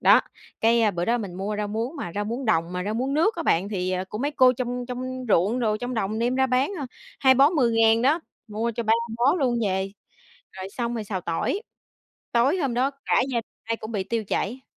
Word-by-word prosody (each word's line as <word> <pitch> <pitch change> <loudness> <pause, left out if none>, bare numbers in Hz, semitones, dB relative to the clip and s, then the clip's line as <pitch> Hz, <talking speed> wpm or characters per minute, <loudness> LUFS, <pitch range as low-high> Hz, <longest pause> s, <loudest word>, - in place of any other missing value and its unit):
Đó, - - +7 0.4
cái 225 -1 +4
bữa 175 -1 -2
đó 240 +1 +1
mình 195 -5 -6
mua 200 +3 -3
rau 210 -1 -2
muống 230 +8 -3
mà 175 -11 -5
rau 205 0 -1
muống 240 +5 -4
đồng 175 -5 +1
mà 180 +1 -3
rau 210 +1 -2
muống 265 +4 -1
nước 345 +8 +2
á 335 - -2
bạn 185 - +2
thì 185 -2 -1
của 210 - -5
mấy 285 +4 0
cô 255 -3 +5
trong 245 0 -3
trong 255 0 -5
ruộng 205 +6 +3
đồ, 215 -2 +1
trong 245 +2 -4
đồng 220 0 -1
đem 240 +2 +1
ra 265 0 +3
bán, 255 +6 +1
à, 275 - -4 0.3
2 260 -1 +5
bó 275 +3 +6
10.000 230 -6 +3
đó, 300 +6 +3 0.3
mua 220 +3 -1
cho 235 - -2
3 220 0 +2 0.3
bó 265 +7 +4
luôn 250 -8 +1
về, 190 +1 -1 0.6
rồi 190 0 -7
xong 240 +1 -3
rồi 220 -2 -3
xào 195 -3 -3
tỏi. 170 - -2 0.7
Tối 255 +9 +3
hôm 270 -7 -1
đó 260 +3 +2 0.2
cả - - +3
gia 235 - +1 0.2
ai 230 0 -1
cũng 220 +1 -8
bị 195 -3 -1
tiêu 225 +1 -2
chảy. 240 +6 -2
235 Hz, 230 wpm, -25 LUFS, 210-255 Hz, 0.7 s, Đó